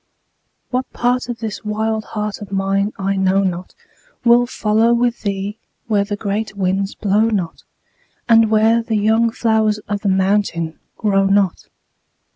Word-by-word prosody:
What 255 +1 -2
part 245 +1 0
of 240 - -3
this 215 -2 -5
wild 220 +1 -2
heart 210 -1 -4
of 200 -2 -9
mine 195 +1 0
I 195 0 -1
know 190 +1 +2
not 180 -1 -3 0.5
Will 240 +1 +5
follow 225 0 +2
with 240 0 0
thee 200 +1 -3 0.3
where 210 -3 +1
the 205 +1 -3
great 205 0 -3
winds 195 +1 -1
blow 205 0 +1
not, 195 -7 -2 0.7
And 225 -1 +5
where 220 +2 +3
the 225 -1 -1
young 220 +2 +3
flowers 220 -2 +1
of 205 -1 -2
the 205 - 0
mountain 190 -4 0 0.2
grow 195 -2 +2
not. 195 -2 +1
210 Hz, 150 wpm, -19 LUFS, 195-225 Hz, 0.7 s, Will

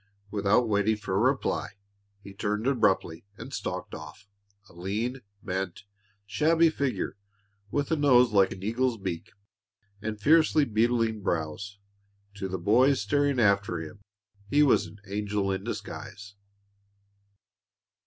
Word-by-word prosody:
Without 105 +4 +2
waiting 105 +1 +2
for 105 -2 -5
a 95 - +2
reply, 130 0 0 0.5
he 100 - -10
turned 105 +2 -2
abruptly 95 -10 +1
and - - -9
stalked - - -4
off, 80 +7 -10 0.4
a - - -19
lean, 105 +9 -3 0.2
bent, 95 +1 -4 0.4
shabby 160 +8 +3
figure 140 -8 -2 0.5
with 145 +5 -1
a - - +4
nose 125 -5 +5
like 100 -2 +4
an 95 - -8
eagle's 120 +3 0
beak 95 -5 -5 0.7
and 110 0 -4
fiercely 155 +2 +4
beetling 115 -1 +1
brows. 85 +4 -3 0.6
To 100 -2 -3
the 95 0 -3
boys 125 +9 +3
staring 140 +6 +1
after 100 -5 +2
him 80 +5 -9 0.5
he 145 +6 +4
was 140 - +3
an 105 - -14
angel 100 0 -2
in 95 - -3
disguise. 105 0 -7
105 Hz, 130 wpm, -27 LUFS, 100-125 Hz, 0.7 s, nose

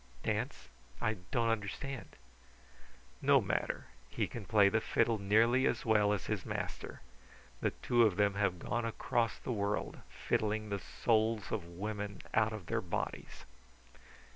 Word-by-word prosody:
"Dance? 60 - -2 0.3
I 110 -1 0
don't 115 -2 +1
understand." 115 +5 -3 1.1
"No - - +6
matter. - - -1 0.2
He - - 0
can 115 -4 -7
play 105 -1 +5
the 110 +2 +2
fiddle 115 0 +2
nearly 115 +6 +4
as - - -1
well 105 -2 +4
as 100 -4 -1
his - - -2
master. - - -5 0.6
The - - +1
two 120 -1 +1
of 110 -5 +5
them 100 0 +3
have 100 -3 +1
gone 120 +7 -2
across 115 0 0
the - - -5
world 100 -1 -1
fiddling 110 0 -1
the 100 -1 -1
souls 110 -1 +1
of 105 -6 -2
women 105 0 -4
out 110 0 +3
of 105 -5 -6
their 110 +5 -1
bodies." 90 - -4
110 Hz, 145 wpm, -34 LUFS, 100-115 Hz, 1.1 s, No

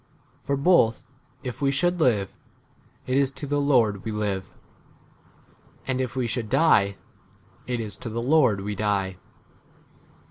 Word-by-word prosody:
For 140 - -2
both 140 -7 +3 0.4
if 125 +2 -6
we 140 - +2
should 175 +6 +1
live, 110 - +1 0.7
[it 130 - -1
is] 140 -1 +2
to 145 - -6
the 145 +1 0
Lord 115 -9 +2
we 110 - -4
live; 105 -3 -3 1.3
and 130 -1 -1
if 125 -1 -4
we 130 -2 0
should 115 -1 -3
die, 100 -12 +3 0.7
[it 125 -1 -2
is] 110 -2 -5
to 120 - -7
the 115 +1 -3
Lord 130 -8 +3
we 105 +1 -3
die 100 -2 -1
120 Hz, 145 wpm, -25 LUFS, 105-140 Hz, 1.3 s, both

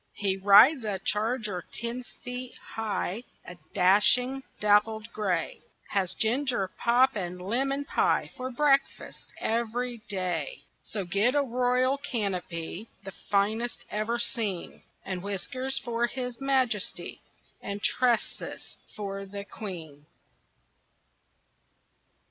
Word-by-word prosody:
He 195 -2 +1
rides 210 +8 +7
a 205 -3 -1
charger 210 -2 -1
ten 235 +2 -3 0.2
feet 250 0 -6 0.2
high, 220 -1 -2 0.2
A 175 - -8 0.2
dashing, 210 +8 +4 0.2
dappled 210 +2 +3
gray; 185 -6 -1 0.3
Has 190 -3 0
ginger 240 -4 +1
pop 245 +5 +3
and 180 -3 -4
lemon 270 +9 0
pie - - +1
For 255 -1 -4
breakfast 275 +1 +1
every 235 +1 -1
day. 180 -7 -2 0.2
So 200 -3 -4
get 200 +9 +2
a 290 - +4
royal 255 +1 +2
canopy, 195 - -3
The 195 - -7 0.2
finest 215 +4 +1
ever 215 +3 0
seen, 220 -6 -2 0.2
And 185 -2 -3
whiskers 255 +8 -3
for 240 -2 0
his 250 0 -5
majesty, 260 -7 0 0.4
And 200 +1 -5
tresses 245 -3 0 0.2
for 195 -2 -4
the 200 +1 -7
queen. 160 -9 -8
220 Hz, 110 wpm, -28 LUFS, 195-250 Hz, 0.4 s, rides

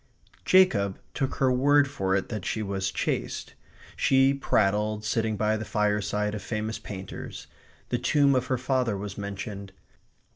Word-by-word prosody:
Jacob 105 - +4 0.2
took 135 -2 -2
her 130 -1 +2
word 140 +3 +4
for 95 -9 -1
it 95 - -1
that 105 -5 -4
she 110 +2 -2
was 95 -1 -2
chaste. - - -3 0.4
She 135 +1 +4
prattled, 105 -4 +1
sitting 110 0 0
by 110 +1 +1
the 110 - -4
fireside, 105 0 0
of 105 - -4
famous 110 +2 -3
painters. 95 -2 -8 0.4
The 120 - 0
tomb 140 +2 +3
of 130 -1 +1
her 130 - +1
father 125 -4 0
was 100 -1 -6
mentioned. 100 -1 -6
110 Hz, 150 wpm, -27 LUFS, 100-130 Hz, 0.4 s, Jacob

